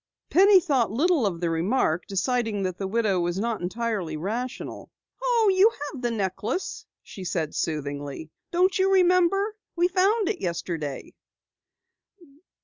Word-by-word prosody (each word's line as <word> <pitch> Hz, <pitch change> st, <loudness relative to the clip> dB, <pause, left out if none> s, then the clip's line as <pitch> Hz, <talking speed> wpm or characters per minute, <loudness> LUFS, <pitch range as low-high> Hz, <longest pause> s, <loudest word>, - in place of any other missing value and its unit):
Penny 390 Hz, +2 st, +7 dB
thought 275 Hz, -, +1 dB
little 285 Hz, -, +2 dB
of 175 Hz, -4 st, -3 dB
the 170 Hz, -1 st, 0 dB
remark, 170 Hz, 0 st, 0 dB
deciding 215 Hz, +1 st, -1 dB
that 185 Hz, -1 st, -3 dB
the 195 Hz, -, -2 dB
widow 205 Hz, -2 st, +1 dB
was 175 Hz, +1 st, -1 dB
not 225 Hz, +1 st, -2 dB
entirely 190 Hz, -4 st, -2 dB
rational. 230 Hz, +9 st, -5 dB, 0.3 s
"Oh, 470 Hz, -4 st, +3 dB
you 390 Hz, +4 st, +6 dB, 0.2 s
have 265 Hz, -, -8 dB
the 240 Hz, -, 0 dB
necklace," 215 Hz, -, -3 dB, 0.2 s
she 190 Hz, -, -10 dB
said 165 Hz, -4 st, -2 dB
soothingly. 145 Hz, -1 st, -4 dB, 0.2 s
"Don't 370 Hz, +2 st, +2 dB
you 380 Hz, +1 st, +3 dB
remember? 375 Hz, +3 st, +3 dB, 0.2 s
We 350 Hz, +1 st, +2 dB
found 390 Hz, +3 st, +2 dB
it 415 Hz, -4 st, -2 dB
yesterday." 165 Hz, -5 st, -4 dB
230 Hz, 140 wpm, -25 LUFS, -, 0.3 s, Penny